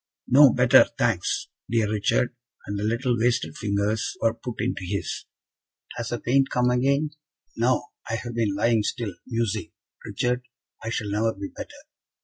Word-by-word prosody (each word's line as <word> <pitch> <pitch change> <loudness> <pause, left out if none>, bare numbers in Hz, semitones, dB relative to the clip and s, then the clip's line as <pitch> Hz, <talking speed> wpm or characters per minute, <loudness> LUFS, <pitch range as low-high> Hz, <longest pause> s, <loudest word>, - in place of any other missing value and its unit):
"No 140 0 +8
better, 125 -1 +6
thanks, - - 0 0.2
dear 115 -2 +2
Richard;" 110 +4 +1 0.3
and 100 0 -3
the - - -2
little 120 +3 +1
wasted 115 -10 +1
fingers 105 +1 -1
were 115 0 +2
put 120 0 -7
into - - -1
his. 90 +1 -3 0.7
"Has 120 - -4
the 120 - -2
pain 135 +3 +3
come 125 0 +2
again?" 140 +4 +2 0.4
"No; 125 +2 +2 0.3
I 115 - 0
have 120 +1 -5
been 110 -4 0
lying 115 +2 +3
still, 105 -1 -3
musing; 115 -3 -2 0.3
Richard, 125 +1 -1 0.4
I 115 - -3
shall 105 -3 -2
never 110 +2 +1
be 100 0 -6
better." - - -8
115 Hz, 155 wpm, -25 LUFS, 105-125 Hz, 0.7 s, No